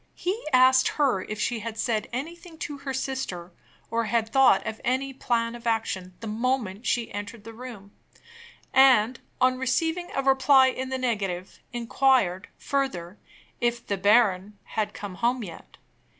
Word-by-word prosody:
He 385 +6 -3
asked 260 0 +6
her 270 -10 +2
if 215 +2 -6
she 235 +1 -1
had 225 0 -6
said 215 -2 -1
anything 330 +6 -6
to 290 -2 -6
her 275 -1 -5
sister, 260 -10 -4 0.4
or 230 0 0
had 225 +1 0
thought 265 -5 +4
of 220 - -5
any 265 +2 0
plan 230 -2 -1
of 240 0 -8
action, 190 -5 -2
the - - -6
moment 225 -2 -2
she 240 -2 0
entered 205 +1 -6
the 225 +1 -10
room; 225 -4 -10 0.8
and, 255 -3 +5 0.2
on 255 0 +3
receiving 320 +7 0
a 275 - 0
reply 265 0 +5
in 260 0 -4
the 260 - -2
negative, 200 -8 -3
inquired, 240 -5 +1
further, 205 -10 -2 0.4
if 240 0 -1
"the 200 - -1
baron" 205 0 +3
had 215 -1 -2
come 205 -2 -6
home 240 +1 +1
yet. 170 -5 -11
240 Hz, 155 wpm, -26 LUFS, 210-265 Hz, 0.8 s, asked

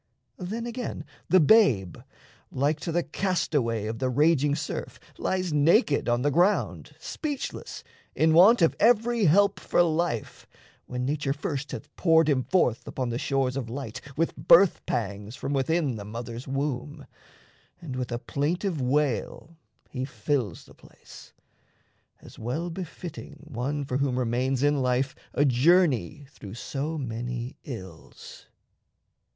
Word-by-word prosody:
Then, 215 +6 -4
again, 240 0 -5 0.2
the 185 - +6
babe, 140 - +4 0.5
Like 145 +4 0
to 170 - -4
the 175 +1 +1
castaway 150 - -1
of 110 +1 -4
the 130 -1 0
raging 145 +1 +3
surf, - - -5 0.2
Lies 185 -3 -1
naked 150 - +3
on 120 +1 +1
the 145 - +2
ground, 180 +8 +1
speechless, 290 -3 -5 0.3
in 160 0 +3
want 190 +5 +7
Of 165 - +3
every 230 0 +3
help 200 +5 +4
for 175 - +2
life, 165 -8 -2 0.4
when 125 0 -3
nature 140 0 -1
first 145 -1 -4
Hath - - -8
poured 165 -3 +4
him 135 -3 +2
forth 125 -7 +1
upon 130 -2 -3
the 120 +1 -2
shores 135 -2 0
of 130 -4 -4
light 125 -1 -6 0.2
With 165 +1 0
birth 180 +2 +5
pangs 105 0 -3
from 140 - -4
within 140 -1 0
the 100 - -7
mother's 115 +3 -7
womb, 135 +1 -3 0.7
And 155 -7 -7
with 125 -1 -4
a 120 - -1
plaintive 150 - -2
wail 145 +4 -1 0.4
he 130 -1 -3
fills 120 - -2
the - - -17
place, - - -16 0.9
As - - -14
well 155 +10 -3
befitting 165 -3 -8
one 140 +4 -2
for 130 -1 -2
whom 135 -2 0
remains 125 +2 0
In 145 -1 +2
life 130 +1 0 0.2
a 145 - +3
journey 145 - +3
through 105 -6 -10
so 145 +6 -4
many 120 -1 -5
ills. 95 - -10
140 Hz, 140 wpm, -26 LUFS, 125-165 Hz, 0.9 s, want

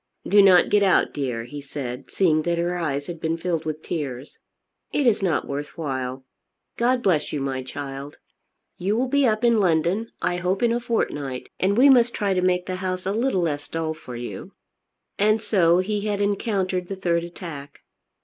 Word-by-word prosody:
"Do 205 +1 +6
not 185 -3 +6
get 210 - +4
out, 195 -2 +3
dear," 125 -5 -2
he 145 +5 -8
said, 135 -2 -6
seeing 160 -5 +2
that 170 +2 -1
her 175 +1 0
eyes 145 -5 -2
had 170 0 -7
been 165 +1 -1
filled 165 -1 -2
with 155 0 -4
tears. 140 -5 -5 0.5
"It 290 - +1
is 230 -5 +3
not 180 -5 0
worth 145 +3 -5
while. 130 -4 -4 0.5
God 245 +1 +1
bless 165 -6 +1
you, 150 - -2
my 135 -1 -2
child! 140 +2 -7 0.6
You 200 +4 0
will 255 +2 +1
be 285 0 +3
up 215 +1 0
in 235 -2 +4
London 180 +4 +1
I 175 - 0
hope 180 +4 -1
in 235 - +4
a 235 - +1
fortnight, 145 - -2
and 200 +3 +2
we 265 +3 +7
must 245 -3 +5
try 200 -2 0
to 185 - +1
make 180 0 +1
the 185 -1 -3
house 185 0 -3
a 195 - 0
little 220 -3 +1
less 145 -4 -2
dull 160 -1 -2
for 125 -5 -10
you." 120 0 -7 0.7
And 215 +2 +4
so 175 -6 +3
he 205 +3 0
had 205 -1 -1
encountered 195 -3 -1
the 195 - -4
third 170 -3 0
attack. 165 -5 -9
175 Hz, 195 wpm, -24 LUFS, 145-205 Hz, 0.7 s, we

